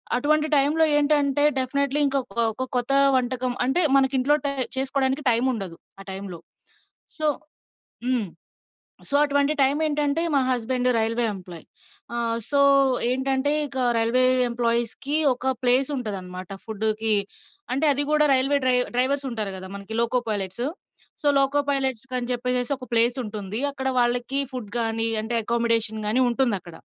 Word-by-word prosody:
అటువంటి 300 +4 +1
టైంలో 290 +3 +3
ఏంటంటే 290 -1 +2 0.2
డెఫినైట్లీ 280 +2 0
ఇంకొక 270 -6 -2 0.2
ఒక 260 - -4
కొత్త 245 +2 0 0.2
వంటకం 255 0 -1
అంటే 265 +8 +1
మన 270 -1 +4
ఇంట్లో 275 +3 +2
టే 280 - +1 0.2
చేసుకోవడానికి 265 +1 -1
టైముండదు 230 -7 -1 0.2
ఆ - - -9
టైంలో. 190 -3 -7 0.8
సో 310 -1 0 0.8
హ్మ్. 250 -5 -1 0.8
సో 280 - -1
అటువంటి 285 +1 +1
టైం 270 +2 +3
ఏంటంటే 295 +1 0
మా 275 - +3
హస్బాండ్ 250 0 0
రైల్వే 230 +2 0
ఎంప్లాయి. 180 -3 -11 0.5
ఆహ్, 230 -1 -1
సో, 285 - +1 0.5
ఏంటంటే 265 +2 0 0.2
ఇక 270 -1 -6 0.2
రైల్వే 230 +3 +2 0.3
ఎంప్లాయీస్‌కి 235 +4 -1 0.2
ఒక 260 +1 -1
ప్లేస్ 255 +2 +3
ఉంటదన్నమాట 185 -6 -6 0.2
ఫుడ్‌కి. 220 0 +1 0.6
అంటే 275 +5 0
అది 285 +1 +5
కూడా 300 0 +3
రైల్వే 270 +2 +2
డ్రై 255 -1 +3 0.2
డ్రైవర్స్ 275 +3 0
ఉంటారు 215 -4 -2
గదా! 190 0 -8
మనకి 200 +2 -8
లోకో 235 +2 +1
పైలెట్స్. 200 +2 -2 0.6
సో - - +1
లోకో 275 +1 +2
పైలెట్సకని 260 -2 -2
చెప్పేసేసి 250 +2 -1
ఒక 255 -1 -11
ప్లేస్ 235 +2 +3
ఉంటుంది. 210 +1 -4
అక్కడ 265 -1 -5
వాళ్ళకి 245 +3 +1
ఫుడ్ 230 -5 -7
గాని 225 0 +1 0.2
అంటే 235 +2 -3
అకామోడేషన్ 230 -2 0
గాని 235 +5 +2
ఉంటుందక్కడ. 205 -10 -2
250 Hz, 140 wpm, -23 LUFS, 225-275 Hz, 0.8 s, అది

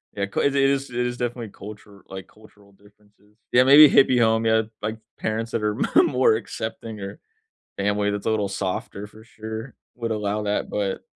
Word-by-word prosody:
Yeah, 100 - -1
'ca 100 - -3
it 140 0 +1
is 135 0 +1
it 125 0 -2
is 120 0 -3
definitely 120 -2 -4
culture 105 -1 -12
like, 95 0 -8
cultural 105 -2 -21
differences 105 +1 -26
Yeah, 125 +1 +5
maybe 145 +3 +9
a - - +6
hippie 125 -2 +1
home, 110 0 +2
yeah. 110 0 +3 0.2
Like, 110 +1 -3 0.2
parents 115 +1 -3
that 115 -2 -2
are 105 0 0 0.3
more 125 -4 +3
accepting 110 -1 -6
or 100 +9 -8 0.6
family 105 +1 0
that's 105 +1 -5
a - - +2
little 105 -2 0
softer 100 +1 -4
for 110 +1 -17
sure 110 +2 -8 0.2
would 115 -1 -4
allow 105 0 -2
that, 105 0 -2
but 100 -2 -2
110 Hz, 190 wpm, -23 LUFS, 105-115 Hz, 0.6 s, maybe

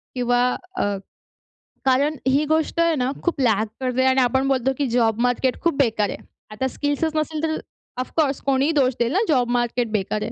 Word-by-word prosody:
किंवा 245 -1 +1 0.3
अ, - - 0 1.0
कारण 280 +4 +2
ही 275 +3 +3
गोष्ट 315 +2 0
आहे 335 -1 +3
ना, 255 -2 0
खूप 345 -5 -1
लॅक 220 -3 +2
करते 255 0 +1
आणि 260 0 +4
आपण 265 +2 +1
बोलतो, 265 -1 +1
की 285 - 0
जॉब 230 -2 +1
मार्केट 250 +1 0
खूप 335 -3 +1
बेकार 220 -7 +1
आहे. - - -5 0.3
आता 260 +5 -2
स्किल्सच 290 +4 -2
नसेल 310 0 -2
तर 315 -1 0 0.4
ऑफकोर्स 275 +1 -1
कोणीही 275 +2 +1
दोष 270 -4 +2
देईल 235 0 +1
ना, 385 - +3
जॉब 250 -6 +2
मार्केट 240 -1 0
बेकार 210 0 -1
आहे. 225 - -4
260 Hz, 185 wpm, -22 LUFS, 245-295 Hz, 1.0 s, आणि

